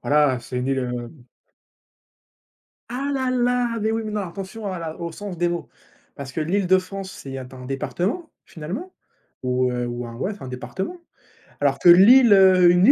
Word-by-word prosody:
Voilà, 145 -3 +3
c'est 125 +2 -7
une 125 - -2
île, 135 -1 +1
heu 125 -1 -4 1.8
Ah 270 +4 -3
là 260 -1 0
là, 245 -2 +1
mais 220 +1 0
oui, 225 - -1
mais 215 - -5
non, 210 -1 -1
attention 195 +3 -6
à 185 - -4
la 160 -1 -6
au 170 0 -4
sens 190 0 -7
des 175 +1 +1
mots 170 -1 -4 0.5
parce 140 -2 -7
que 160 - -3
l'Île-de-France, 190 +2 0
c'est 135 -1 -8
un 130 0 -10
département 180 - -3 0.2
finalement, 190 - -7 0.5
ou, 125 0 0
heu, 125 0 -2
ou 120 0 -5
un 115 - -8
ouais 185 - -3
un - - -7
département, 165 - -5 0.6
alors 140 -1 +2
que 175 - +5
l'Île, 220 +7 +8
heu, 185 -2 +6
une 180 +2 +4
île, 275 - +8
175 Hz, 180 wpm, -23 LUFS, 135-210 Hz, 1.8 s, l'Île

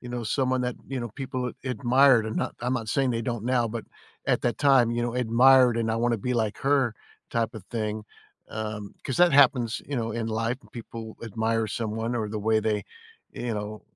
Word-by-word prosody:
you 125 - -9
know, 120 -1 -4
someone 130 +1 0
that, 125 -1 -2
you 135 -1 -3
know, 120 -2 -4
people 130 -2 -3
ad - - -7
admired, 125 0 +4
and 110 - -4
not - - -2
I'm 125 +1 -1
not 115 -3 -3
saying 135 +2 +1
they 115 - -1
don't 120 -2 -3
now, 120 -2 +1
but 115 0 -5 0.4
at - - +2
that 120 - 0
time, 135 -5 +5
you 120 0 -1
know, 120 0 -2
admired 125 +1 +5
and 115 -1 0
"I - - 0
wanna 120 0 +1
be 125 +5 -2
like 110 -3 -1
her" 135 -4 +2 0.4
type 115 -1 -1
of 110 - -9
thing. 110 -2 -3 0.4
Um, 105 -1 -5
'cause 130 - -2
that 175 -2 +6
happens, 125 -4 +4
you 145 - -4
know, 115 -1 -1
in 115 -1 -2
life 115 +2 -1
when - - -21
people 115 -1 -8
admire 110 0 -1
someone, 110 +2 -3
or 110 -2 -2
the 110 - -4
way 110 +1 +2
they, 105 -2 -1 0.5
you 120 -1 -4
know, 105 +1 -5
115 Hz, 220 wpm, -26 LUFS, 110-125 Hz, 0.5 s, that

